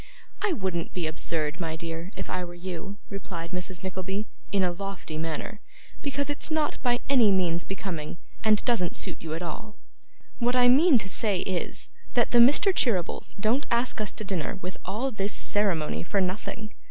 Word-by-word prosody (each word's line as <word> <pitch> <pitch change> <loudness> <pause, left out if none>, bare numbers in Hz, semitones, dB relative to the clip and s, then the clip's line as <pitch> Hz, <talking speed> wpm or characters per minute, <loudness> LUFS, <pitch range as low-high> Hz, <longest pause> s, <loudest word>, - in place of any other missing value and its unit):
'I 425 -4 +2
wouldn't 185 - -2
be 180 -3 -1
absurd, 155 0 -1
my 165 -2 -2
dear, 165 +2 -5
if - - -4
I 185 0 -2
were 175 0 -7
you,' 185 +2 -5
replied 170 -4 -5
Mrs. 180 0 -3
Nickleby, 190 +2 -2 0.3
in 200 -2 +3
a 180 - +2
lofty 195 -3 -5
manner, 160 +6 -3 0.4
'because 280 0 -1
it's 290 +1 -2
not 310 -1 0
by 245 -1 +2
any 245 -7 +6
means 175 -3 +2
becoming, 180 -6 -4 0.3
and 215 -1 +4
doesn't 220 -8 +1
suit - - -1
you 160 -1 -3
at 170 - -4
all. 210 +6 -6 0.6
What 245 0 +2
I 245 -1 +6
mean 285 +3 +7
to 200 -4 -2
say 195 -1 +1
is, 185 -3 -3 0.3
that 240 -2 +3
the 240 - +6
Mr. 290 +11 +6
Cheerybles 200 - +1
don't 230 +8 +2
ask 235 -1 +2
us 210 - 0
to - - -4
dinner 195 0 -1
with 185 0 -5
all 225 +8 -1
this 205 -2 -1
ceremony 190 -7 +1
for 200 +4 0
nothing. 210 +3 -2
195 Hz, 180 wpm, -28 LUFS, 175-235 Hz, 0.6 s, mean